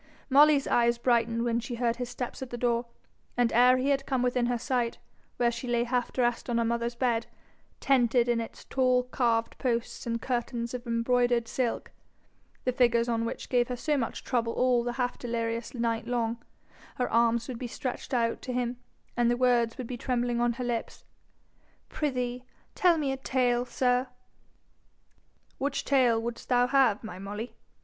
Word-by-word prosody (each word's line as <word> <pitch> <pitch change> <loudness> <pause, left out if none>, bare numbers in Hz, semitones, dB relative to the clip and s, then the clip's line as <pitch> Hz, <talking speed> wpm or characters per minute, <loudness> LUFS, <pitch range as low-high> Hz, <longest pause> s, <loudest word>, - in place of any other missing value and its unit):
Molly's 285 0 +6
eyes 235 0 +3
brightened 235 -1 +1
when 235 -1 +1
she 240 +1 -5
heard 235 -1 0
his 245 -1 -4
steps 245 +1 -5
at 260 - -5
the 240 - -5
door, 235 0 0 0.5
and 245 -1 +2
ere 250 +2 +6
he 260 +2 0
had 275 -1 0
come 260 -2 0
within 250 -1 +1
her 245 0 0
sight, 245 -1 -1 0.4
where 240 -1 +2
she 235 +2 -6
lay 240 -1 +1
half 245 0 -1
dressed 240 0 0
on 235 - +1
her 235 - +2
mother's 235 +1 -1
bed, 235 -2 0 0.5
tented 245 -2 +3
in 240 -1 +1
its 225 - -9
tall 255 -1 +2
carved 235 -2 0
posts 235 -1 -2
and 230 0 -1
curtains 240 -1 -3
of 250 0 -6
embroidered 235 0 +1
silk, 245 -1 -2 0.7
the 255 - +1
figures 240 -2 +3
on 230 -1 0
which - - -5
gave 245 -1 +2
her 250 - -3
so 300 +4 0
much 245 -5 -3
trouble 230 -3 0
all 250 -1 +2
the 240 0 -2
half 245 0 -2
delirious 230 0 -3
night 230 -1 -1
long, 235 -1 -1 0.5
her 250 - 0
arms 235 0 +2
would 250 -3 -6
be 250 - -4
stretched 255 +2 -5
out 230 -3 0
to 255 - -5
him, 245 0 -2 0.4
and 240 -1 +3
the 240 - +1
words 240 -2 +2
would 255 - -4
be 245 +1 -5
trembling 240 -1 -1
on 240 0 +2
her 250 - -5
lips, 240 -2 -4 0.8
'Prithee, 250 -4 -2 0.3
tell 355 -3 +4
me 285 -3 0
a 270 - -2
tale, 250 -2 +1
sir.' 250 0 +1 1.5
'Which 280 +1 -1
tale 250 -5 +3
wouldst 235 +1 -6
thou 245 -1 +4
have, 250 -5 +3
my 185 -4 -7
Molly?' 205 +4 -6
240 Hz, 180 wpm, -28 LUFS, 235-250 Hz, 1.5 s, Molly's